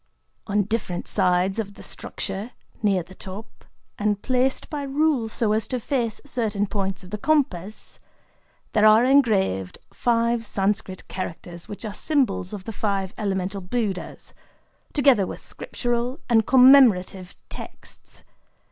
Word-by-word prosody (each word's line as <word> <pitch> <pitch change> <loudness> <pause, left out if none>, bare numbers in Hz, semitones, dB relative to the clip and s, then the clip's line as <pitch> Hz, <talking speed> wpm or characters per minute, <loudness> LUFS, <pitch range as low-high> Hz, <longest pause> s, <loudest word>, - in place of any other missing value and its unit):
On 205 0 +2
different 200 -4 -3
sides 180 +3 +2
of 200 -2 -4
the - - -12
structure,—near 200 -1 -3
the 185 - -15
top, 200 +4 -10 0.3
and 205 -1 +1
placed 255 +3 0
by 295 -2 -4
rule 280 -4 +1
so 220 -1 0
as 220 0 0
to 255 - -2
face 235 -3 -1
certain 220 -7 -1
points 195 -2 -3
of 180 - -13
the 210 - -4
compass,—there 215 - -1 0.8
are 215 +2 +7
engraved 205 - +2 0.2
five 235 -1 +1
Sanscrit 195 -2 -2
characters 175 -1 -6
which 205 +2 -7
are 210 - -4
symbols 250 - 0
of 205 -3 -6
the 225 - -6
Five 200 -3 -2
Elemental 195 -1 -2
Buddhas, 195 0 -4 0.6
together 265 -10 +4
with - - -7
scriptural 240 +3 -3
and 225 -3 +3
commemorative 240 -9 +5
texts. - - -10
210 Hz, 130 wpm, -24 LUFS, 190-245 Hz, 0.8 s, are